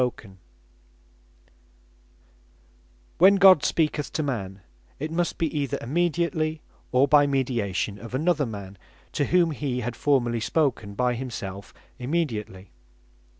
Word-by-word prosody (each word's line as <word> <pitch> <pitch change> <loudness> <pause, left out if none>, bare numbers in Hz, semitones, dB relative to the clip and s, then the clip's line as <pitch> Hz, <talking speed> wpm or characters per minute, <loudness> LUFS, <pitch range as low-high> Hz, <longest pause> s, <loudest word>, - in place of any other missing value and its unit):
How 125 - +3
God - - -19
Speaketh 95 -4 -16 0.5
To - - -34 0.5
Men - - -35 1.5
When 190 +3 +7
God 190 -5 +7
speaketh 150 -2 0
to 155 - -1
man, 100 -8 -4 0.4
it 155 +3 -5
must 170 0 -1
be 160 -2 -2
either 140 -3 -1
immediately; 160 +1 -1 0.3
or 130 +2 +4
by 145 0 +5
mediation 115 -7 -1
of 115 +3 -7
another 155 -1 +1
man, 100 -3 -8 0.3
to 145 - 0
whom 175 0 +3
he 135 -4 -3
had 120 +1 -4
formerly 120 -5 +1
spoken 115 -5 -1
by 125 +2 +1
himself 100 -6 -6 0.3
immediately. 120 - -3
130 Hz, 135 wpm, -25 LUFS, 110-155 Hz, 1.5 s, When